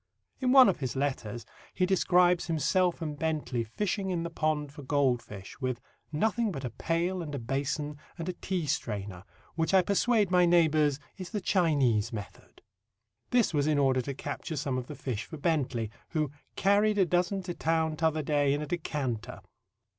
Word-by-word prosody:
In 255 -2 +1
one 260 -1 +9
of 195 - +1
his 130 -3 -3
letters 120 -5 -2 0.3
he 185 - +2
describes 180 -2 +3
himself 170 +2 +1
and 150 -2 -5
Bentley 155 -7 -1
fishing 190 - -2
in 175 -2 -1
the 170 - -4
pond 155 -3 -1
for 145 - -9
goldfish 130 -6 -1
with 130 -2 -1 0.3
"nothing 220 +7 +1
but 135 -6 -5
a 125 - -4
pail 170 +8 -1
and 150 -3 -5
a - - -2
basin 140 +4 -2 0.2
and 165 0 -5
a 185 - -1
tea 180 -2 -3
strainer, 100 - -3 0.3
which 165 +3 +1
I 185 - +6
persuade 205 0 +2
my 180 -1 +5
neighbours 155 -4 +3 0.2
is 185 -2 -7
the 215 - -2
Chinese 140 - +2
method." 105 -4 -9 0.7
This 240 -7 +2
was 145 -1 +1
in 155 -1 +2
order 135 -2 +3
to 140 +2 -5
capture 160 - -5
some 135 -2 -1
of 125 - -7
the 150 - -7
fish 125 -5 -4
for 160 - -8
Bentley, 135 -8 0 0.2
who 155 -4 -1 0.2
"carried 205 +2 +3
a 195 - +5
dozen 180 +3 0
to 180 -1 -4
town 160 -1 0
t'other 155 -1 +1
day 145 -1 +2
in 145 - -3
a - - -3
decanter." 140 -8 -3
155 Hz, 180 wpm, -29 LUFS, 135-180 Hz, 0.7 s, one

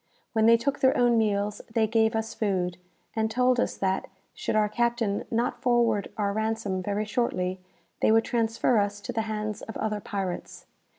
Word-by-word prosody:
When 220 -1 +4
they 230 0 +7
took 275 +4 -1
their 260 0 +4
own 240 -1 +4
meals, 205 -1 0
they 225 0 +2
gave 220 0 +2
us 220 0 -2
food, 180 -4 -1 0.4
and 220 0 +1
told 250 +2 +2
us - - 0
that, 190 0 -1 0.3
should - - -3
our 215 -1 +4
captain 235 -2 0
not 245 +1 -1
forward 235 -4 +2
our 200 -2 0
ransom 220 -3 -1
very 205 +3 -1
shortly, 190 -6 -1 0.4
they - - +3
would 225 0 +4
transfer 230 0 +1
us 205 0 -1
to 245 +4 -6
the 225 - 0
hands 215 -1 -3
of 225 - -7
other 215 -1 -1
pirates. 190 -3 -5
220 Hz, 180 wpm, -27 LUFS, 205-235 Hz, 0.4 s, they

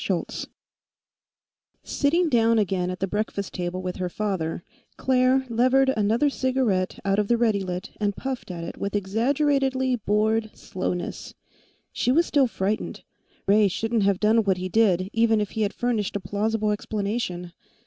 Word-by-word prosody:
Sitting 335 +5 +1
down 230 -4 +3
again 185 -3 0
at 185 0 -5
the - - +2
breakfast 205 -1 -3
table 180 +1 -3
with 180 -1 -4
her 180 -1 -2
father, 175 -5 -2 0.3
Claire 260 0 +2
levered 255 +3 +3
another 220 +7 +2
cigarette 255 -9 0
out 195 +1 +2
of 210 - +1
the 235 - +3
Readilit 200 -5 -1
and 205 -1 0
puffed 265 -5 -5
at 170 -2 -5
it - - -7
with 200 +1 -3
exaggeratedly 260 +5 +1
bored 220 +1 +1
slowness. 180 -1 -4 0.6
She 250 - +1
was 335 +6 +4
still 280 -6 +3
frightened. 210 -1 -3 0.4
Ray 205 +1 +5
shouldn't 225 +4 -1
have 195 -1 +2
done 220 +2 +3
what 195 -2 +1
he 185 0 -4
did, 185 -3 +3
even 225 -1 +3
if 210 -1 -2
he 220 - -3
had 205 -1 +1
furnished 230 -6 -1
a - - 0
plausible 210 +2 -1
explanation. 200 -4 -3
215 Hz, 150 wpm, -25 LUFS, 190-240 Hz, 0.6 s, Ray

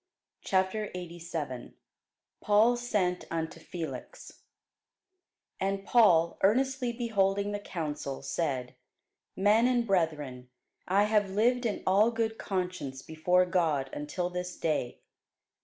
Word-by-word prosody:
CHAPTER 190 +3 0
87 165 -7 -6 0.7
PAUL 215 +4 +4
SENT 210 -7 -1
UNTO 165 -1 -3
FELIX 165 -3 -8 1.2
AND 195 0 -1
Paul, 170 -9 +4
earnestly 255 +4 +2
beholding 205 -4 0
the 205 - -3
council, 150 -8 -5
said, 135 -3 -2 0.6
Men 210 +5 +4
and 245 -2 +2
brethren, 150 - -1 0.4
I 195 +3 +4
have 210 -2 +2
lived 235 +5 +2
in 210 - -4
all 200 +4 +4
good 225 -1 -2
conscience 180 -9 -3
before 180 +3 +2
God 160 -7 0
until 175 +5 -3
this 180 0 -4
day. 150 -6 -2
185 Hz, 105 wpm, -30 LUFS, 160-210 Hz, 1.2 s, PAUL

